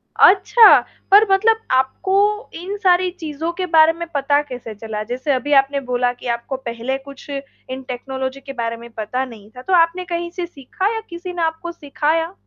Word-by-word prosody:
अच्छा, 430 Hz, +4 st, +7 dB, 0.3 s
पर 410 Hz, +2 st, +8 dB
मतलब 440 Hz, +3 st, +4 dB
आपको 390 Hz, -, +1 dB
इन 370 Hz, +4 st, -5 dB
सारी 365 Hz, -2 st, +3 dB
चीज़ों 320 Hz, +1 st, -4 dB
के 370 Hz, +1 st, -3 dB
बारे 325 Hz, -2 st, +5 dB
में 340 Hz, +1 st, -6 dB
पता 285 Hz, +1 st, +2 dB
कैसे 245 Hz, -6 st, -8 dB
चला, 215 Hz, 0 st, -5 dB
जैसे 255 Hz, +5 st, -3 dB
अभी 285 Hz, +3 st, -1 dB
आपने 275 Hz, +1 st, +3 dB
बोला 245 Hz, 0 st, +1 dB
कि 245 Hz, -, -10 dB
आपको 260 Hz, +3 st, -6 dB
पहले 240 Hz, +1 st, -4 dB
कुछ 275 Hz, +1 st, -13 dB
इन 275 Hz, -2 st, -7 dB
टेक्नोलॉजी 265 Hz, +1 st, -4 dB
के 275 Hz, 0 st, -8 dB
बारे 230 Hz, -2 st, -3 dB
में 235 Hz, +1 st, -11 dB
पता 225 Hz, +4 st, -3 dB
नहीं 220 Hz, -4 st, -13 dB
था? 250 Hz, -, -11 dB
तो 370 Hz, +8 st, -2 dB
आपने 350 Hz, +1 st, +3 dB
कहीं 345 Hz, 0 st, -3 dB
से 355 Hz, -1 st, -4 dB
सीखा 350 Hz, -, -3 dB
या 445 Hz, -, -3 dB
किसी 350 Hz, +1 st, -7 dB
ने 345 Hz, -, -4 dB
आपको 325 Hz, +1 st, -2 dB
सिखाया? 325 Hz, +2 st, -1 dB
290 Hz, 190 wpm, -20 LUFS, 260-350 Hz, 0.3 s, पर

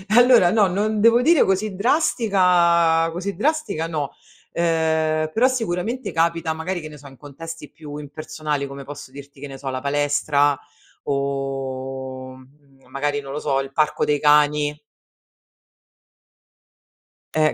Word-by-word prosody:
Allora 245 Hz, -7 st, +6 dB
no, 210 Hz, -1 st, +4 dB
non 210 Hz, +3 st, -1 dB
devo 230 Hz, +2 st, +5 dB
dire 325 Hz, +3 st, +5 dB
così 195 Hz, +1 st, 0 dB
drastica 180 Hz, -, +3 dB
così 185 Hz, +3 st, -4 dB
drastica 215 Hz, -, -1 dB
no. 150 Hz, -4 st, -4 dB, 0.4 s
Ehm, 160 Hz, -2 st, +1 dB
però 245 Hz, +4 st, +4 dB
sicuramente 230 Hz, -1 st, -2 dB
capita 165 Hz, 0 st, 0 dB
magari 170 Hz, +3 st, -4 dB
che 155 Hz, -, -8 dB
ne 150 Hz, -1 st, -11 dB
so 140 Hz, 0 st, -13 dB
in 135 Hz, -, -15 dB
contesti 150 Hz, +2 st, -9 dB
più 150 Hz, -2 st, -10 dB
impersonali, 150 Hz, 0 st, -4 dB
come 140 Hz, 0 st, -9 dB
posso 145 Hz, -2 st, -9 dB
dirti, 140 Hz, 0 st, -13 dB
che 145 Hz, -, -6 dB
ne 135 Hz, -1 st, -9 dB
so, 135 Hz, -, -9 dB
la 130 Hz, 0 st, -4 dB
palestra 145 Hz, 0 st, +1 dB, 0.5 s
o, 135 Hz, -1 st, -4 dB
uhm, 135 Hz, +1 st, -18 dB
magari 145 Hz, +1 st, -2 dB
non 135 Hz, -1 st, -8 dB
lo 150 Hz, -, -3 dB
so, 135 Hz, -3 st, 0 dB
il 135 Hz, 0 st, -5 dB
parco 155 Hz, -1 st, +1 dB
dei 145 Hz, -1 st, +1 dB
cani 150 Hz, 0 st, +3 dB, 2.5 s
eh, 155 Hz, -1 st, +2 dB
155 Hz, 140 wpm, -22 LUFS, 140-180 Hz, 2.5 s, Allora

